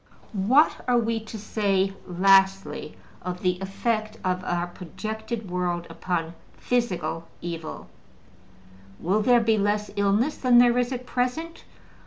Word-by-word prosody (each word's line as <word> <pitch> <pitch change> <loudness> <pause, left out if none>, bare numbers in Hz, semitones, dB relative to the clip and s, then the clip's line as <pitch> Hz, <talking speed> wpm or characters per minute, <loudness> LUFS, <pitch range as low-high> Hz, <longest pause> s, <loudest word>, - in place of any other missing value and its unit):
What 235 +10 +3
are 245 -1 +4
we 230 -1 +1
to 220 - -7
say, 195 -2 0
lastly, 195 +2 +3 0.2
of 180 0 -5
the 180 -1 +1
effect 215 +2 -2
of 185 -1 -1
our 175 0 0
projected 215 +5 -6
world 175 -1 -1
upon 170 -2 -2 0.2
physical 175 -9 -1
evil? 165 -2 -6 1.1
Will 195 +5 +1
there 240 +1 +5
be 220 -1 +2
less 205 +1 0
illness 205 +9 +2
than 250 -2 +4
there 240 0 +6
is 245 +1 0
at 250 -1 -4
present? 255 +8 -2
205 Hz, 130 wpm, -25 LUFS, 180-235 Hz, 1.1 s, there